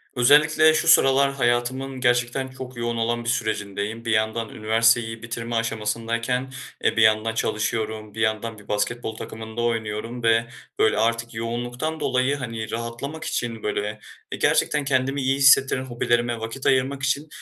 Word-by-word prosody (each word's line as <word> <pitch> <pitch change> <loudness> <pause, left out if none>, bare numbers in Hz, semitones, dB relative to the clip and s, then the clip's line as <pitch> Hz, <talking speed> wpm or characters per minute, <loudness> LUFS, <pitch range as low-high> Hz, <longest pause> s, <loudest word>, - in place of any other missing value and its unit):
Özellikle 150 +5 +5
şu 160 - 0
sıralar 140 -3 +5
hayatımın 130 +1 -1
gerçekten 120 +1 +1
çok 130 -1 -9
yoğun 120 0 -2
olan 120 +1 -1
bir 115 - -2
sürecindeyim. 110 -1 -3
Bir 115 - -1
yandan 110 +1 0
üniversiteyi 115 +1 +1
bitirme 120 0 -5
aşamasındayken, 115 +3 -2 0.3
eee, - - +1
bir - - +4
yandan 110 +1 +3
çalışıyorum, 110 -1 -2
bir 110 - -5
yandan 110 0 -1
bir 105 - -17
basketbol 110 +2 -2
takımında 110 +1 -7
oynuyorum 115 +1 -3
ve, 115 0 +3 0.3
böyle, 110 - +3
artık 115 +1 0
yoğunluktan 120 +7 -3
dolayı, 135 -1 +1
hani, 115 -5 -5
rahatlamak 120 +7 -5
için, 115 -2 -3
böyle, 105 0 -2 0.3
eee, - - -4
gerçekten 150 -2 +2
kendimi 135 +1 0
iyi 135 +1 +1
hissettiren 135 -1 +5
hobilerime 120 -1 0
vakit 115 +4 -6
ayırmak 135 +1 +1
için, 140 +3 0
120 Hz, 150 wpm, -23 LUFS, 110-130 Hz, 0.3 s, Özellikle